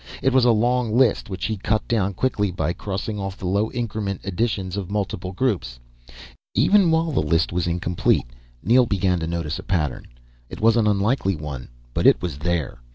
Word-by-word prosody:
It 135 - +3
was 130 -2 +4
a 120 - +6
long 120 0 +1
list 125 -6 +3
which 95 -1 -4
he 110 -1 -2
cut 110 +3 -1
down 100 -4 0
quickly 105 -3 0
by 85 -1 -1
crossing 105 +2 -4
off 95 -1 -4
the - - -7
low 100 +4 +1
increment 110 -5 -3
additions 95 -1 -2
and 100 -3 -4
multiple 100 -3 -3
groups. 90 - -1 0.8
Even 180 - +4
while 160 0 +2
the 135 - +1
list 80 +3 +1
was 90 -1 0
incomplete, 85 -3 +1 0.4
Neel 125 +2 +4
began 95 -3 +1
to 80 - -3
notice 85 -2 -3
a - - -8
pattern. 75 -8 -2 0.4
It - - -8
was 115 +1 +4
an 115 -2 +3
unlikely 100 0 +1
one, 70 -5 -6 0.3
but - - +2
it - - +6
was 85 -6 -5
there. 85 -6 -2
100 Hz, 190 wpm, -23 LUFS, 85-115 Hz, 0.8 s, a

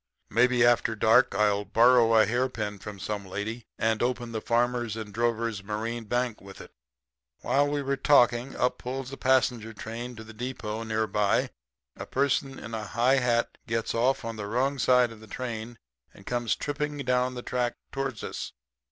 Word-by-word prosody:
Maybe 125 +1 +4
after 120 -1 +3
dark 110 +3 +4
I'll 105 -1 +2
borrow 115 +2 +5
a 110 - +6
hairpin 110 -3 -2
from 105 0 -8
some 100 +2 -4
lady, 110 +5 -5
and 110 -1 +1
open 120 -1 -1
the 110 -1 -3
Farmers 120 -1 0
and 110 -2 -7
Drovers 115 -2 -1
Marine 110 +3 -4
Bank 120 0 -1
with 95 0 -12
it.' - - -11 0.7
"While 145 +2 +2
we 145 0 -1
were 140 0 -1
talking, 125 -3 +3
up 125 - 0
pulls 130 +1 -5
a - - -5
passenger 125 -4 +1
train 115 +3 -6
to 110 - -9
the 110 0 -12
depot 115 -2 -5
near 110 -1 0
by. 105 -1 +1 0.4
A - - -8
person 135 0 0
in 115 - -8
a 110 -1 -3
high 125 +5 +3
hat 120 -2 0
gets 115 0 -1
off 125 +2 +1
on 115 -1 -5
the 105 -1 -5
wrong 130 +5 0
side 125 -2 +4
of 115 - -12
the 110 - -14
train 115 0 -5 0.4
and 95 - -16
comes 120 -4 0
tripping 145 0 -3
down 125 -2 0
the 125 - -6
track 125 -1 -1 0.2
towards 135 -4 -3
us. - - -5
120 Hz, 180 wpm, -27 LUFS, 110-125 Hz, 0.7 s, a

